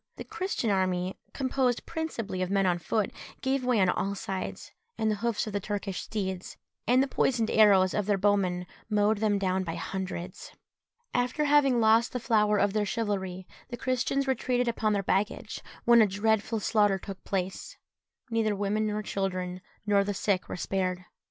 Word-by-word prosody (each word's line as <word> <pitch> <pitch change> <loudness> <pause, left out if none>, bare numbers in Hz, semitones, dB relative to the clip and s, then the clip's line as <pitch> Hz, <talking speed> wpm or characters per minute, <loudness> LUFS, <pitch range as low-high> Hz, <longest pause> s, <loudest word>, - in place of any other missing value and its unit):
The - - -7
Christian 365 - -2
army, 185 -1 0 0.2
composed 260 -2 0
principally 235 - -4
of 185 - -1
men 195 0 +2
on 175 -1 +2
foot, 210 +4 -1 0.3
gave 265 0 0
way 250 -3 +2
on 190 - +4
all 200 +2 -1
sides, 190 -1 -5 0.3
and 220 0 +1
the 210 - -1
hoofs 230 0 -1
of 215 - -6
the 205 - 0
Turkish 200 -1 -3
steeds, 190 -4 -4 0.3
and 255 +2 +5
the - - -1
poisoned 235 -4 +1
arrows 195 -4 +5
of 210 -1 -1
their 205 -2 +3
bowmen, 190 -3 +1 0.2
mowed 210 0 +2
them 210 -2 +2
down 190 -1 0
by 165 -2 -4
hundreds. 185 0 -5 0.6
After 250 +5 +1
having 285 -4 +4
lost 225 +1 +4
the 250 - -1
flower 210 -3 +2
of 200 0 +2
their 215 -1 +1
chivalry, 190 -4 -2 0.2
the 240 - -5
Christians 260 +2 0
retreated 250 -1 0
upon 220 -2 +1
their 200 -1 0
baggage, 195 +2 -1 0.2
when 235 -1 +7
a 215 - +5
dreadful 220 +2 0
slaughter 205 -2 +2
took 195 0 -9
place. 190 -1 -3 0.5
Neither 220 -2 +1
women 205 +2 0
nor 210 0 -2
children, 185 -2 -3 0.2
nor 200 -1 +3
the 205 0 -3
sick, 190 -1 0
were - - -4
spared. 185 0 -2
205 Hz, 175 wpm, -28 LUFS, 190-230 Hz, 0.6 s, when